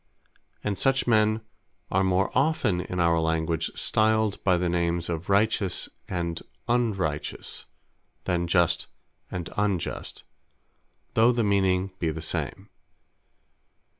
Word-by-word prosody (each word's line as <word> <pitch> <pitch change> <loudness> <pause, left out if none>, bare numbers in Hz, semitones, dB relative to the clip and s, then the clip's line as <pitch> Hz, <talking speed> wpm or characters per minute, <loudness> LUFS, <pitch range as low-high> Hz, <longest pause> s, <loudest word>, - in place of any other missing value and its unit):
And 100 -2 -2
such 135 0 +2
men 110 -1 +3 0.5
are 95 +1 +3
more 95 +1 +2
often 135 - +2
in 90 0 -4
our 85 -1 +3
Language 80 0 0
stiled 110 -1 +1
by 90 -2 +4
the 90 0 0
names 85 0 0
of 85 +2 -4
Righteous, 100 -2 +2 0.2
and 85 -2 -2 0.3
Unrighteous; 100 -11 -1 0.6
then 85 -1 0
Just, 85 -1 +2 0.4
and 90 -1 -4
Unjust; 100 -4 -2 0.9
though 115 +2 +5
the 120 -1 +1
meaning 95 -2 +2
be 85 - 0
the 80 +1 -4
same. - - -3
95 Hz, 115 wpm, -26 LUFS, 85-110 Hz, 0.9 s, though